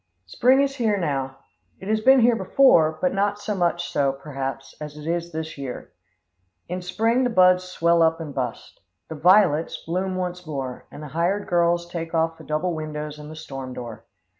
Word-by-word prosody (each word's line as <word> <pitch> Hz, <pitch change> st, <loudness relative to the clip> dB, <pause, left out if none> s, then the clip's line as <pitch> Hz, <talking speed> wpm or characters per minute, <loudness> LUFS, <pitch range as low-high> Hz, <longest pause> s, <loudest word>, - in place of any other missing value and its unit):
Spring 250 Hz, -, +3 dB
is 275 Hz, 0 st, -3 dB
now 170 Hz, -, 0 dB
here. 135 Hz, -, -18 dB, 0.5 s
It 190 Hz, -, -8 dB
has 215 Hz, 0 st, +1 dB
been 265 Hz, +2 st, +6 dB
here 235 Hz, 0 st, +5 dB
before, 185 Hz, -7 st, +4 dB
but 180 Hz, -, +1 dB
not 200 Hz, +1 st, 0 dB
so 205 Hz, +1 st, -3 dB
much 175 Hz, -2 st, -1 dB
so, 140 Hz, -1 st, +2 dB
perhaps, 135 Hz, -1 st, -6 dB
as 150 Hz, 0 st, -7 dB
it 150 Hz, -, -9 dB
is 170 Hz, +1 st, -2 dB
this 160 Hz, -2 st, -6 dB
year. 135 Hz, -3 st, -7 dB, 0.8 s
In 180 Hz, +1 st, -4 dB
spring 225 Hz, +8 st, +1 dB
the 250 Hz, -, +1 dB
buds 185 Hz, -4 st, +4 dB
swell 170 Hz, -2 st, +2 dB
up 165 Hz, 0 st, +3 dB
and 155 Hz, -3 st, -6 dB
bust. 125 Hz, -4 st, -5 dB, 0.3 s
The 160 Hz, -, -5 dB
"violets" 165 Hz, -1 st, +4 dB
bloom 185 Hz, +3 st, -2 dB
once 180 Hz, -1 st, -4 dB
more, 135 Hz, -4 st, -5 dB
and 150 Hz, -, -10 dB
the 150 Hz, -, -8 dB
hired 175 Hz, +7 st, -1 dB
girl 175 Hz, -1 st, +3 dB
takes 170 Hz, -1 st, -6 dB
off 165 Hz, 0 st, 0 dB
the -, -, -11 dB
double 160 Hz, +4 st, -1 dB
windows 150 Hz, -1 st, -5 dB
and 150 Hz, 0 st, -9 dB
the 155 Hz, -, -9 dB
storm 135 Hz, -4 st, -7 dB
door. 120 Hz, -3 st, -8 dB
170 Hz, 190 wpm, -23 LUFS, 150-185 Hz, 0.8 s, been